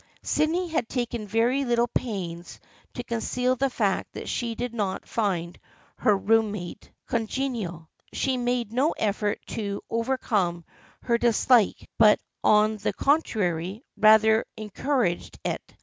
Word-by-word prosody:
Sydney 330 +4 +1
had 275 -8 -1
taken 240 -4 -3
very 235 +6 +2
little 240 -2 +2
pains 180 -8 -4 0.4
to 245 - -4
conceal 250 +2 -1
the 270 +1 +1
fact 205 -6 -1
that - - -7
she 235 -2 -2
did 245 +1 -4
not 205 -5 -3
find 180 -6 -2 0.4
her 210 -2 +3
room 220 +1 +2
mate 180 0 -8
congenial. 225 - -3 0.2
She 265 -1 0
made 245 -3 -1
no 275 +6 +2
effort 205 -1 -1
to 200 -3 -3
overcome 215 -8 0 0.4
her 235 -1 +1
dislike 235 -2 +3
but 215 -2 +6 0.2
on 215 +1 +4
the 205 - -2
contrary 205 - 0
rather 220 +1 +5
encouraged 215 -2 -1
it. - - -1
225 Hz, 130 wpm, -26 LUFS, 205-245 Hz, 0.4 s, but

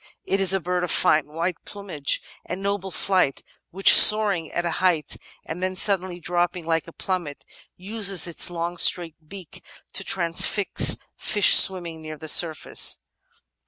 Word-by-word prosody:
It 195 0 -3
is 190 - +3
a 195 - +2
bird 180 0 -4
of 180 - -5
fine 155 -1 0
white 165 +3 -5
plmnage 190 -9 -4 0.2
and 185 +2 -9
noble 200 -1 -4
flight, 185 -5 -2 0.3
which, 195 +2 +5
soaring 205 -7 +5
at 175 - -5
a 170 - -3
height 175 -5 -1 0.3
and 165 +3 -9
then 185 0 -4
suddenly 185 -2 +1
dropping 175 0 -3
like 165 0 -3
a - - -12
plmnmet, 175 -6 -7 0.4
uses 200 0 0
its 170 0 0
long 175 0 -6
straight 170 -2 +2
beak 190 -6 -14 0.3
to - - -4
transfix 180 +3 +1 0.2
fish 205 -2 +2
swimming 170 -4 +4
near 155 -1 -10
the 155 - -12
surface. 160 0 0
180 Hz, 155 wpm, -21 LUFS, 165-190 Hz, 0.4 s, which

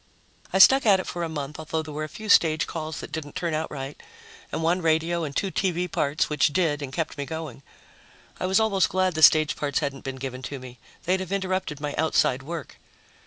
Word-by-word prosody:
I - - +1
stuck 270 +8 +8
at 195 -2 +6
it 185 - -4
for 175 - -5
a 165 - -2
month, 150 -1 -5
although 160 0 -3
there 155 -1 -8
were 155 +1 -3
a 155 - -5
few 215 +6 -9
stage 160 -5 +4
calls 155 -2 -5
that - - -9
didn't 150 -3 -6
turn 170 -2 -2
out 155 +1 -2
right, 135 0 -7 0.5
and 160 - -3
one 175 +3 +2
radio 165 +1 +1
and 145 -2 -5
two 195 -2 -1
TV 180 -2 0
parts, 150 +4 0
which 150 - +2
did 150 -1 0
and 135 -2 -5
kept 160 -1 -3
me 140 - -2
going. 160 -5 -6 0.8
I 185 - -1
was 190 +3 +3
almost 200 -5 +2
glad 185 0 +1
the 155 - -3
stage 155 -1 +6
parts 145 -1 -2
hadn't 140 -3 -2
been 135 -1 -5
given 130 -1 -6
to 140 +2 -6
me; 125 -2 -11 0.2
they'd 185 +2 +1
have 185 -1 -6
interrupted 185 -6 -2
my 145 -1 -3
outside 145 -4 +2
work. 160 +1 -7
160 Hz, 225 wpm, -25 LUFS, 145-180 Hz, 0.8 s, stuck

